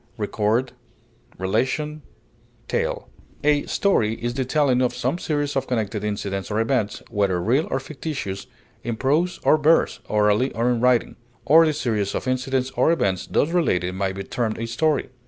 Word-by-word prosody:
incident, 110 +4 0 0.6
narration, 130 - -1 1.4
A 145 0 +3
story 115 - +1
is 120 +1 -3
the 130 +1 -1
telling 130 -1 +2
of 125 - +1
some 135 +8 -1
series 145 -3 -1
of 135 -1 -1
connected 110 -4 -2
incidents 100 -2 -3
or 105 +1 0
events, 115 -2 0
whether 100 -5 +1
real 125 - +1
or - - 0
fictitious, 135 -7 -5 0.4
in 120 -1 -2
prose 150 +9 +1
or 155 - +5
verse, 160 +2 +3
orally 105 +4 +2
or 120 +2 +1
in 120 -2 0
writing; 125 -1 +2 0.3
or 160 +3 +6
the 155 - +1
series 110 -9 -1
of - - -3
incidents 130 +1 0
or 160 - +2
events 95 - 0
thus 145 - +1
related 90 - +1
may 95 0 -1
be 95 +1 -6
termed 110 +2 -2
a 115 - -3
story. 145 +4 0
125 Hz, 160 wpm, -23 LUFS, 105-145 Hz, 1.4 s, or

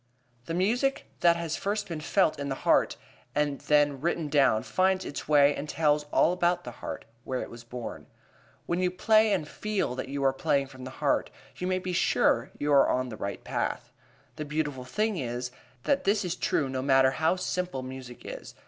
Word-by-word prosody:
The 165 - -3
music 240 +9 +1
that 170 -1 +5
has 170 -2 -3
first 205 +1 -2
been 165 -3 -5
felt 160 -1 +2
in 140 0 -3
the 135 - -1
heart - - +3 0.4
and 145 -2 0
then 145 -2 +3
written 165 -1 -1
down 130 -6 +3
finds 185 +6 +1
its 145 - -6
way 145 -1 +5
and 150 +2 -5
tells 150 -2 +2
all 160 +3 +3
about 175 0 +1
the 120 - -6
heart, - - -7 0.2
where 130 -1 -3
it - - -9
was 115 0 -10
born. 120 0 -7 0.6
When 170 - -1
you 180 0 +2
play 215 +4 +4
and 175 -7 0
feel 210 -6 -2
that 130 +1 -5
you 140 0 -3
are 135 -1 +3
playing 140 -1 +1
from 130 -1 -10
the - - -5 0.2
heart, 140 - +2 0.3
you 180 - -3
may 185 0 +1
be 185 0 -4
sure 125 -6 +2
you 145 0 0
are 140 - +6
on 130 0 0
the 110 - -6
right 100 0 -5
path. - - -3 0.5
The 155 - -3
beautiful 150 -3 -3
thing 210 - -1
is, 125 -2 -3 0.3
that 280 - +1
this 200 0 +2
is 175 -1 -2
true 150 -5 0
no 130 -1 -3
matter 135 -1 +4
how 160 +5 +1
simple 180 -6 -3
music 130 -1 -9
is. - - -8
150 Hz, 200 wpm, -28 LUFS, 130-180 Hz, 0.6 s, are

